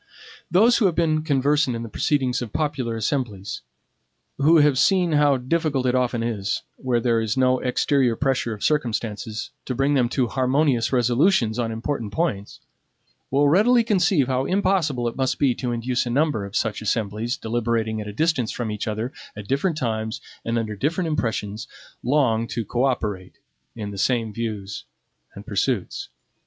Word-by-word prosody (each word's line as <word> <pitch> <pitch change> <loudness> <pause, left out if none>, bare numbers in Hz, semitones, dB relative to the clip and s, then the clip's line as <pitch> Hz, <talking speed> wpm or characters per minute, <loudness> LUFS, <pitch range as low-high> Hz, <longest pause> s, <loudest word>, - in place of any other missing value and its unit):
Those 225 +7 +5
who 210 - +4
have 175 - -1
been 155 -2 +2
conversant 145 -2 +1
in 115 - -4
the - - -6
proceedings 130 +2 0
of 120 -4 -5
popular 140 -6 -2
assemblies; 110 -4 -3 0.8
who 155 +4 +5
have 145 -3 +4
seen 185 -3 +3
how 145 -2 +4
difficult 135 0 0
it 125 - +2
often 125 -2 0
is, 105 -4 -2
where 125 -2 0
there 115 -1 +1
is 110 +2 -2
no 130 0 +3
exterior 125 -1 +1
pressure 135 -2 0
of 105 -2 -6
circumstances, 115 -6 -2
to 130 - -3
bring 135 +3 +2
them 125 -4 +2
to 130 0 +1
harmonious 130 -1 +1
resolutions 125 - +2
on 115 -1 -1
important 115 -1 -3
points, 120 - -2 0.7
will 140 +2 +3
readily 225 +10 +4
conceive 185 - +2
how 130 +1 0
impossible 180 -10 +1
it 115 - -4
must 130 -1 0
be 135 -3 +3
to 125 0 -3
induce 120 +1 -1
a - - -2
number 135 -5 +1
of 100 +2 -9
such 110 -3 -1
assemblies, 110 +3 -1
deliberating 115 -1 -1
at 105 - -7
a - - -5
distance 140 -1 0
from 115 -3 -3
each 105 +1 -4
other, 110 +5 -3 0.2
at 105 -1 -8
different 150 +5 0
times, 110 -5 -2 0.2
and 115 +1 -1
under 110 -2 -2
different 160 - -1
impressions, 115 -5 -2 0.3
long 120 -4 +2
to 115 +3 -3
co 120 +6 0
operate 105 -8 -2 0.4
in 105 -3 -5
the 100 - -7
same 115 -1 0
views 105 -3 -5 0.5
and - - -10
pursuits. - - -2
125 Hz, 170 wpm, -23 LUFS, 110-145 Hz, 0.8 s, Those